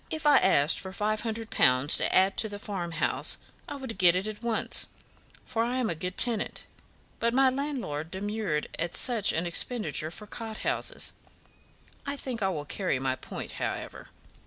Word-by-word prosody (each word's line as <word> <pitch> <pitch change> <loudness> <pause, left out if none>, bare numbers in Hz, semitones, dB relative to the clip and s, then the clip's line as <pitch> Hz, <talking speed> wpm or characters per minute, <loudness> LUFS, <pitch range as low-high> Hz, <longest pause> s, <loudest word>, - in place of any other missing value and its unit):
If 315 0 -4
I 290 -2 +7
asked 155 -5 +4
for 190 - -3
five 215 +2 -1
hundred 225 -1 -4
pounds 130 +3 +4
to - - 0
add 190 +1 +4
to 220 - +1
the 205 - -6
farmhouse, 175 -6 -1 0.3
I - - -5
would 260 -8 -7
get 180 -1 +6
it 185 +2 0
at 215 0 -5
once, 235 -2 +2 0.6
for 230 -3 -2
I 240 +2 -1
am 245 -7 0
a - - +1
good 180 +3 -6
tenant; 230 -4 +4 0.6
but 235 +1 +1
my 265 0 +5
landlord 255 - -3
demurred 195 -4 -2
at 170 +1 -2
such 235 -5 +2
an 165 +2 -1
expenditure 175 -2 +2
for 210 +5 -5
cot 220 +1 -7
houses. - - 0 0.9
I 280 0 -2
think 250 -5 -4
I 190 - +2
will 150 -5 -4
carry 185 -3 -1
my 130 0 -1
point, - - -8
however." - - -5
210 Hz, 180 wpm, -28 LUFS, 170-235 Hz, 0.9 s, I